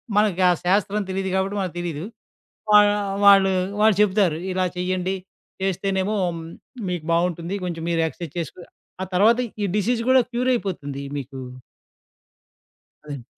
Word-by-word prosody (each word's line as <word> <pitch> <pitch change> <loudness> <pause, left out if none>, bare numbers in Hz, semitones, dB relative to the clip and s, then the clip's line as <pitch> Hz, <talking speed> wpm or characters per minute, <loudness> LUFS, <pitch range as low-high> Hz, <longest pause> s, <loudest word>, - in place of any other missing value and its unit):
మనకు 205 -3 +2
ఆ - - +6
శాస్త్రం 200 +3 +1
తెలీదు 190 0 -2
గాబట్టి 190 +2 0
మనకు 185 -3 -3
తెలీదు. 165 -2 -4 0.7
వా 210 - +9 0.5
వాళ్ళు, 195 -1 +7 0.3
వాళ్ళు 215 -2 +5
చెప్తారు. 195 -6 +3
ఇలా 185 0 0
చెయ్యండి, 185 +1 -1 0.5
చేస్తేనేమో 195 +2 0
హ్మ్, 165 -1 -6 0.5
మీకు 175 -3 -3
బాగుంటుంది. 170 +1 0
కొంచెం 165 -2 -4
మీరు 165 -1 +1
ఎక్స్‌ర్‌సైజ్ 160 -2 -9
చేసుకొ 170 +2 -5 0.4
ఆ - - 0
తర్వాత 220 +6 +5 0.2
ఈ - - +1
డిసీజ్ 230 +3 +1
కూడా 260 0 +6
క్యూరైపోతుంది 195 - -1
మీకు. 135 -1 -6 1.7
అదండి. 140 -5 -7
185 Hz, 130 wpm, -23 LUFS, 170-205 Hz, 1.7 s, వా